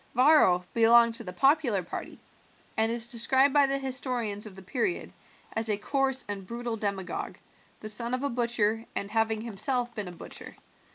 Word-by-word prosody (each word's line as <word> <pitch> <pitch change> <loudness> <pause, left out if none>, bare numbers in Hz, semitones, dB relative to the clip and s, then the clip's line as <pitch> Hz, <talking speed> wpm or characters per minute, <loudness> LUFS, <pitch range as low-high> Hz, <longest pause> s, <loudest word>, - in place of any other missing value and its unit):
Varro 250 - +5
belonged 230 0 +6
to 230 - 0
the 180 - -6
popular 255 - +2
party, 170 - -7 0.6
and 220 +1 +2
is 235 0 -2
described 265 +3 +3
by 285 -1 +5
the 275 0 0
historians 250 -6 -1
of 195 - -11
the 190 - -10
period 255 - -2 0.4
as 225 0 -1
a 210 - +2
coarse 265 +4 -1
and 200 -2 -5
brutal 235 0 -4
demagogue, 200 -4 -3 0.4
the 215 - -6
son 235 +3 -1
of 255 - -5
a 280 - 0
butcher, 230 -2 0
and 200 0 -2
having 220 0 +1
himself 240 +3 -1
been 210 -4 -4
a - - -6
butcher. 175 - -10
230 Hz, 175 wpm, -28 LUFS, 210-255 Hz, 0.6 s, belonged